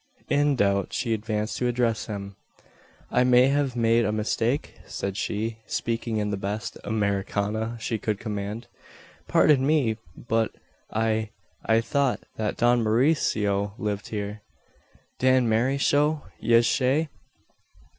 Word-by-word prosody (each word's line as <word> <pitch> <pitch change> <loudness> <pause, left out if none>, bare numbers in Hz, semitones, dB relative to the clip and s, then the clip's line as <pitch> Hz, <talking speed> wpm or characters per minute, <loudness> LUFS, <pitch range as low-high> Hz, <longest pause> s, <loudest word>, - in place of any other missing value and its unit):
In 145 0 +3
doubt 100 -4 +1
she 120 -3 0
advanced 110 0 -2
to 125 - 0
address 120 -2 0
him: 100 -2 -6 0.8
"I 125 - +3
may 125 +1 +5
have 140 -2 0
made 115 0 +3
a 105 - +1
mistake?" 115 +5 -1
said 100 -1 -4
she, 110 +2 -2
speaking 115 -1 -2
in 105 -1 -1
the 100 - -1
best 100 +3 -4
"Americana" 105 +2 -1
she 110 0 -2
could 105 -1 -1
command. 105 +2 -4 0.6
"Pardon 145 -4 +4
me, 135 -7 +2 0.2
but 115 -1 -1 0.4
I 110 0 0 0.3
I 115 0 +3
thought 140 +2 0 0.2
that 110 -1 -2
Don 120 0 +3
Mauricio 110 -5 +1
lived 105 -1 -3
here." 105 0 -4 0.8
"Dan 130 -1 +4
Marryshow, 140 +6 +2 0.2
yez 115 0 +4
say? 140 +4 +1
115 Hz, 125 wpm, -26 LUFS, 105-125 Hz, 0.8 s, may